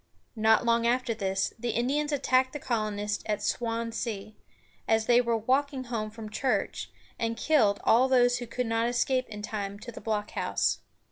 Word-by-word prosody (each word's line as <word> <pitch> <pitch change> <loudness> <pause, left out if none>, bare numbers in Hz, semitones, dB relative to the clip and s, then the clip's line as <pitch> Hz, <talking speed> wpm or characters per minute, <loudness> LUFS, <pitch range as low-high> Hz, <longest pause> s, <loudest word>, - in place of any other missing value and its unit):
Not 220 +1 +4
long 235 0 +3
after 245 -1 +1
this, 195 -2 -1
the 240 +1 -2
Indians 285 +6 0
attacked 260 -2 +2
the 295 - -4
colonists 210 -4 -2
at 210 -1 +1
Swan´sea, 230 -1 -3 0.5
as 225 0 +2
they 240 +1 +5
were 235 -1 +1
walking 265 +4 0
home 230 -4 -3
from 215 -1 -9
church, 255 +4 -1 0.3
and 230 0 -1
killed 220 -9 +3
all 245 +4 +5
those 245 -1 +4
who 240 - -6
could 250 +2 -2
not 225 +1 +1
escape 255 +1 0
in 210 -1 -7
time 205 -2 -4
to 235 +3 -9
the - - -10
blockhouse. 210 -2 -1
230 Hz, 165 wpm, -28 LUFS, 215-250 Hz, 0.5 s, they